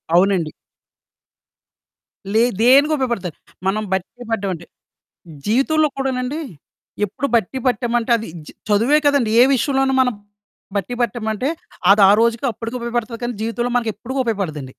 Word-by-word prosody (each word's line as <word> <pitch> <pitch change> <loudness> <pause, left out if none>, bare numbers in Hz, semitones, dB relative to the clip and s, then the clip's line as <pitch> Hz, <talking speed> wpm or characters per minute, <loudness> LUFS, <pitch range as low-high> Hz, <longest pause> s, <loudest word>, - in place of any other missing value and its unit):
అవునండి. 180 -4 +3 1.8
లే 225 +2 +4 0.2
దేనికి 275 +6 +5
ఉపయోగపడతది. 235 - -2 0.3
మనం 215 +3 0
బట్టీ 190 +6 -4
పట్టమంటే. 190 -6 -2 0.8
జీవితంలో 300 +8 +2
కూడానండి 265 +2 -2 0.7
ఎప్పుడు 250 +8 -3
బట్టీ 230 +4 0
పట్టామంటే 240 0 0
అది 225 - -7 0.2
చ - - -9 0.2
చదువే 230 +9 +4
కాదండీ 280 -6 +3
ఏ - - +9
విషయంలోనూ 270 +1 +1
మనం 250 -2 +1 0.6
బట్టీ 200 +4 -2
పట్టామంటే 235 +2 -1 0.4
అది 205 +1 +6
ఆ - - +7
రోజుకి 235 +3 +1
అప్పటికి 230 +3 -6
ఉపయోగపడతది 235 -1 -3
కానీ 240 -2 -3
జీవితంలో 240 +2 -2
మనకెప్పుడు 240 +4 -3
ఉపయోగపడదండి. 155 - -3
235 Hz, 120 wpm, -20 LUFS, 205-255 Hz, 1.8 s, ఏ